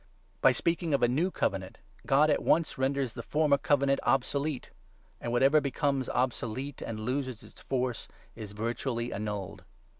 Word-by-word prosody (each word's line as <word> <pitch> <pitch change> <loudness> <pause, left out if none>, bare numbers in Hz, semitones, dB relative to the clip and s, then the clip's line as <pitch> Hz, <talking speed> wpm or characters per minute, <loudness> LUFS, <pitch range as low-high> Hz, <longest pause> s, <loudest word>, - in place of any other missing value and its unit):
' 100 0 -36
By - - +7
speaking 165 +4 0
of 135 - 0
a - - +6
'new' 150 +10 +1
Covenant, 95 - -2 0.3
God 150 +3 +5
at - - +2
once 165 -2 +2
renders 135 -2 0
the - - -6
13 - - -23
former 150 -2 +4
Covenant 140 -1 +2
obsolete; 140 +1 0 0.5
and 120 - -4
whatever 135 +5 +4
becomes 140 -1 0
obsolete 130 +2 -2
and 110 -1 -5
loses 130 0 -3
its - - -15
force 125 -3 -2 0.3
is 105 -3 -8
virtually 115 +2 -2
annulled. 105 -2 -4
130 Hz, 160 wpm, -30 LUFS, 115-140 Hz, 0.5 s, By